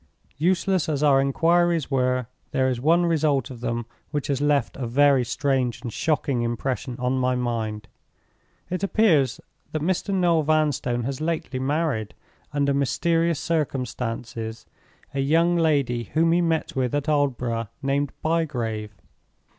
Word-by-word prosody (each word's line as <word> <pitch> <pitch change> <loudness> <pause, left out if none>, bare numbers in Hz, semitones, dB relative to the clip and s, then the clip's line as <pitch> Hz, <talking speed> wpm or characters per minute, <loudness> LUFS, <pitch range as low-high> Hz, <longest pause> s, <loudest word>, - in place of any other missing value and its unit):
"Useless 185 +1 +1
as 150 -1 0
our 140 -2 +5
inquiries 165 +3 +2
were, 130 -1 +1 0.2
there 130 0 +1
is 125 -2 -1
one 170 +5 +4
result 150 -5 +1
of 120 -2 -10
them 120 -1 -2 0.2
which 145 -1 -2
has 140 -1 0
left 145 -4 +1
a 130 -3 -4
very 135 +1 +4
strange 125 -1 -1
and 120 -4 -5
shocking 145 -5 0
impression 120 +2 -2
on 125 +1 0
my 125 0 +1
mind. 110 -3 -3 0.8
"It 185 - -2
appears 185 - +3 0.3
that 155 -1 -2
Mr. 185 +3 0
Noel 175 -4 +3
Vanstone 145 -6 +1
has 135 +3 -4
lately 155 -5 -2
married, 135 -5 -1 0.4
under 140 0 +1
mysterious 165 +3 +1
circumstances, 120 -7 -3 0.5
a 140 - -2
young 165 +5 +3
lady 140 -8 +1
whom 165 +1 +2
he 175 +1 +3
met 165 -1 -1
with 130 0 0
at 145 +1 -1
Aldborough, 125 -6 0 0.2
named 140 +1 0
Bygrave. 120 -10 -1
140 Hz, 140 wpm, -24 LUFS, 125-160 Hz, 0.8 s, our